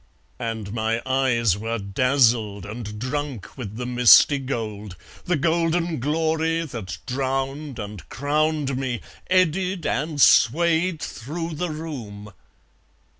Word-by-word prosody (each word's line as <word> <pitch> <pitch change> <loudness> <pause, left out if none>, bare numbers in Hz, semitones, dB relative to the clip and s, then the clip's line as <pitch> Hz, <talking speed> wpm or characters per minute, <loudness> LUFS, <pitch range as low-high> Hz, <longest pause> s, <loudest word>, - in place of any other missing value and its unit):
And 110 -3 -4
my 110 0 0
eyes 120 -7 +2
Were 115 +2 -2
dazzled 110 -1 +1
and 105 0 -7
drunk 130 - -4
with 110 -6 -7
the 125 +2 -4
misty 125 +3 +6
gold, 110 -7 -5 0.3
The 180 - +1
golden 165 +1 +1
glory 160 +3 0
that 105 - -6
drowned 135 +2 -2
and 105 -3 -8
crowned 150 -1 0
me 130 -3 -3 0.3
Eddied 185 -1 +1
and 150 +2 -1
swayed 165 +6 +4
through 165 +7 -5
the 175 +3 -3
room 120 -11 -7
130 Hz, 115 wpm, -23 LUFS, 115-155 Hz, 0.3 s, misty